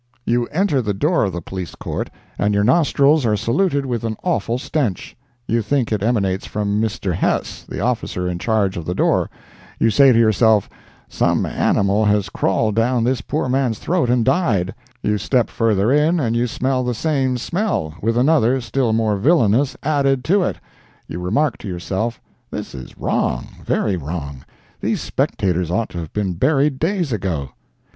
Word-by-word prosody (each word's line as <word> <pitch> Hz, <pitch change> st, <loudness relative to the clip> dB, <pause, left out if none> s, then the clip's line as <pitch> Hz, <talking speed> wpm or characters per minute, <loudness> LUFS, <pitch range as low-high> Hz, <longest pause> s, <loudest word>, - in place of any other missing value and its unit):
You 120 Hz, 0 st, +1 dB
enter 160 Hz, -5 st, +1 dB
the 105 Hz, -4 st, -2 dB
door 150 Hz, -, +2 dB
of 95 Hz, -, -2 dB
the 85 Hz, -1 st, -5 dB
Police 95 Hz, -2 st, -6 dB
Court, -, -, -4 dB, 0.3 s
and 105 Hz, 0 st, +1 dB
your 100 Hz, -, +3 dB
nostrils 140 Hz, +3 st, +3 dB
are 105 Hz, -3 st, +2 dB
saluted 140 Hz, -, +1 dB
with 120 Hz, -3 st, -2 dB
an 110 Hz, -2 st, -3 dB
awful 160 Hz, -9 st, 0 dB
stench; 125 Hz, -, -2 dB, 0.3 s
you 115 Hz, +1 st, +1 dB
think 125 Hz, +2 st, 0 dB
it 105 Hz, -3 st, 0 dB
emanates 100 Hz, -4 st, 0 dB
from 105 Hz, 0 st, -1 dB
Mr. 105 Hz, -4 st, -2 dB
Hess, -, -, -1 dB
the -, -, -4 dB
officer 90 Hz, 0 st, -1 dB
in 90 Hz, -1 st, -3 dB
charge 105 Hz, -2 st, 0 dB
of 85 Hz, -, -5 dB
the 90 Hz, -, -2 dB
door; -, -, +2 dB, 0.5 s
you 115 Hz, -, +2 dB
say 135 Hz, +3 st, +6 dB
to 115 Hz, -, +3 dB
yourself, 110 Hz, -2 st, +4 dB, 0.4 s
"Some -, -, +1 dB
animal 100 Hz, +2 st, +1 dB
has 105 Hz, -1 st, +2 dB
crawled 105 Hz, +3 st, 0 dB
down 120 Hz, +1 st, +2 dB
this 125 Hz, 0 st, 0 dB
poor 150 Hz, +3 st, -2 dB
man's 130 Hz, -3 st, 0 dB
throat 170 Hz, -, 0 dB
and 120 Hz, -2 st, +2 dB
died"; 120 Hz, -, +1 dB, 0.3 s
you 105 Hz, 0 st, +1 dB
step 125 Hz, 0 st, +1 dB
further 110 Hz, -1 st, +1 dB
in, 155 Hz, +4 st, +3 dB
and 115 Hz, -5 st, 0 dB
you 120 Hz, +1 st, +1 dB
smell 130 Hz, +2 st, -1 dB
the 125 Hz, -1 st, -1 dB
same 135 Hz, -1 st, 0 dB
smell, 155 Hz, -, -2 dB
with 115 Hz, +2 st, 0 dB
another, 130 Hz, -2 st, +3 dB
still 115 Hz, 0 st, 0 dB
more 110 Hz, -2 st, +1 dB
villainous, 130 Hz, -, +3 dB
added 140 Hz, -3 st, +1 dB
to 195 Hz, +4 st, +3 dB
it; 180 Hz, -, -1 dB, 0.5 s
you 85 Hz, -, -6 dB
remark 115 Hz, +10 st, 0 dB
to -, -, -8 dB
yourself, 95 Hz, +6 st, -3 dB, 0.3 s
"This -, -, -6 dB
is 65 Hz, -, -10 dB
wrong—very 60 Hz, +9 st, -1 dB
wrong; 70 Hz, -4 st, -6 dB, 0.3 s
these -, -, -1 dB
spectators 90 Hz, -3 st, -1 dB
ought 105 Hz, +6 st, -1 dB
to 85 Hz, -, -6 dB
have 80 Hz, -2 st, -7 dB
been 100 Hz, -3 st, -1 dB
buried 135 Hz, -, +1 dB
days 175 Hz, -3 st, 0 dB
ago." 90 Hz, -, -2 dB
115 Hz, 175 wpm, -20 LUFS, 100-135 Hz, 0.5 s, say